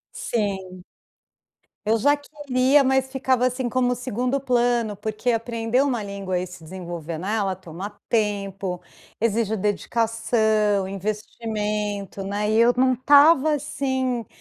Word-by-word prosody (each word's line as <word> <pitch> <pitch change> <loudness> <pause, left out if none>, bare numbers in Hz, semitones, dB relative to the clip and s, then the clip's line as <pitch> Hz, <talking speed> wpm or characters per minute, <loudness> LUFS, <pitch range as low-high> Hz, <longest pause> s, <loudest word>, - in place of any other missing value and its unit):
Sim. 200 - -2 1.1
Eu 220 +2 +3
já 285 +6 +3
queria, 285 -2 +2
mas 265 0 +2
ficava, 260 -2 +1
assim, 255 0 -1
como 250 0 +1
o - - +1
segundo 250 +2 -2
plano 240 -4 +1
porque 215 +4 -2
aprender 230 +1 0
uma 255 -6 0
língua 200 -2 -3
e 180 - -3
se 180 -2 -12
desenvolver 170 -2 -6
nela 195 +1 -1
toma 185 +3 -8
tempo, 200 -4 -1 0.4
exige 220 -1 +1
dedicação, 215 -1 +1
investimento, 210 0 -3
né, 205 +2 -1
e 220 - +2
eu 235 +1 +5
não 255 0 +3
estava, 290 +4 +6
assim, 260 -5 -1
225 Hz, 125 wpm, -23 LUFS, 200-255 Hz, 1.1 s, estava